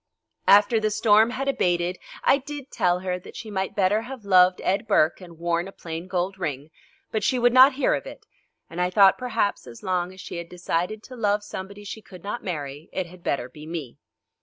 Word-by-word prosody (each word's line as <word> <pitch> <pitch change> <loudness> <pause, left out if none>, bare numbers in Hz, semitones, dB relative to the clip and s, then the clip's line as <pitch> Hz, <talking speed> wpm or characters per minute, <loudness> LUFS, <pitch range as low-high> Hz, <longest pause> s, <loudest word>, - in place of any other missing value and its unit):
After 205 +3 +6
the 215 0 +1
storm 215 +1 +4
had 265 +3 -3
abated 180 -8 0 0.2
I 275 - +4
did 285 0 -8
tell 180 0 +1
her 180 -1 -2
that - - -13
she 220 - -7
might 190 -1 -2
better 205 +2 +2
have 245 -2 -9
loved 185 -1 +5
Ed 200 +4 0
Burke 155 +5 +3
and 170 -2 -12
worn 170 +1 -1
a - - -9
plain 165 -1 -7
gold 185 +1 -2
ring, 150 -3 -4 0.4
but 215 -2 -1
she 255 - +2
would 245 0 +3
not 260 +2 +8
hear 275 - +1
of - - -3
it, - - -11 0.4
and 170 +2 -5
I 180 - +2
thought 195 +1 +5
perhaps 240 - -1
as 115 -1 -12
long 180 -1 -1
as 190 - -14
she 180 - -7
had 170 0 -7
decided 180 +4 -2
to 255 - -11
love 205 -3 +1
somebody 200 0 -8
she 210 +2 -7
could 185 -4 -14
not 210 +4 -4
marry, 150 -3 -5
it 185 - -2
had 175 +1 -14
better 140 -6 -1
be 150 +4 -12
me. 160 -7 -6
185 Hz, 215 wpm, -25 LUFS, 175-215 Hz, 0.4 s, not